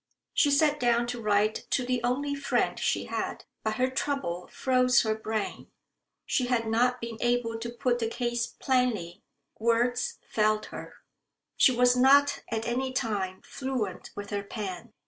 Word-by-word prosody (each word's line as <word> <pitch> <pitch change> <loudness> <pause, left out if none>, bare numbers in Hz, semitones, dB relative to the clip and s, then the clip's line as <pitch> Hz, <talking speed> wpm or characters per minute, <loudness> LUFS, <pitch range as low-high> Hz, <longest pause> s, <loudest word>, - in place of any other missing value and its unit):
She 290 - +4
sat 295 +1 +3
down 240 -1 +2
to 240 -1 -4
write 210 0 +1
to 250 - +1
the 250 -1 0
only 280 +4 0
friend 280 - 0
she - - 0
had. - - -4 0.2
But 220 0 -1
her 255 +3 +2
trouble 260 -10 -2
froze 255 -1 +3
her 220 -1 +1
brain. 220 -1 -4 0.6
She 250 - 0
had 240 -2 +1
not 245 +3 +2
been 230 -2 -6
able 240 -2 0
to 235 +1 -4
put 240 +1 0
the 225 - 0
case 240 0 -1
plainly. 220 -9 -1 0.4
Words 240 +2 +1
failed 215 0 +1
her. - - -8 0.6
She - - +6
was 250 0 +4
not 280 +3 +5
at 225 0 -2
any 260 +2 -1
time 200 -7 -2
fluent 255 -8 -4
with 205 +1 -7
her 205 -1 -1
pen. 200 -3 -6
240 Hz, 160 wpm, -28 LUFS, 220-255 Hz, 0.6 s, She